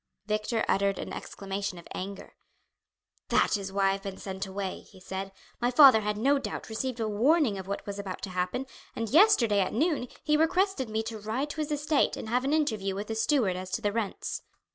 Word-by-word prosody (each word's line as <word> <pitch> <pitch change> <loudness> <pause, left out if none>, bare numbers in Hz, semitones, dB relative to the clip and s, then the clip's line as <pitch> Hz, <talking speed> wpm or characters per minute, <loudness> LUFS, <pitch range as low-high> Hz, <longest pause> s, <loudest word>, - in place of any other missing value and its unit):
Victor 215 +2 0
uttered 200 0 +2
an - - -5
exclamation 195 -1 -5
of 170 - -11
anger. 195 +2 -6 1.0
"That - - +3
is 195 -2 -4
why 195 0 +2
I - - +3
have 195 0 -3
been 195 -1 -6
sent 190 0 -5
away," 190 0 -4
he 190 - -17
said. 190 +1 -5 0.3
"My 245 - +2
father 260 -4 +8
had 210 0 -1
no 275 +6 +3
doubt - - -5
received 245 +2 -3
a 225 - 0
warning 235 - +3
of 190 - -8
what 200 - -4
was 200 0 -5
about 190 -2 -6
to 195 - -4
happen, 180 +8 -2 0.3
and 230 -1 -2
yesterday 280 - +5
at 190 - 0
noon 295 -1 +1 0.2
he 300 0 +3
requested 335 - +1
me 220 +1 -1
to 225 -1 -6
ride 235 +8 -2
to - - -9
his 305 0 -3
estate 295 0 +1
and 220 - -6
have 250 +2 +1
an 275 - 0
interview 220 -11 0
with 205 +2 -5
the 225 - -2
steward 225 -5 +2
as 185 0 -6
to - - -1
the 205 - +2
rents. 215 -2 -3
215 Hz, 215 wpm, -29 LUFS, 195-265 Hz, 1.0 s, father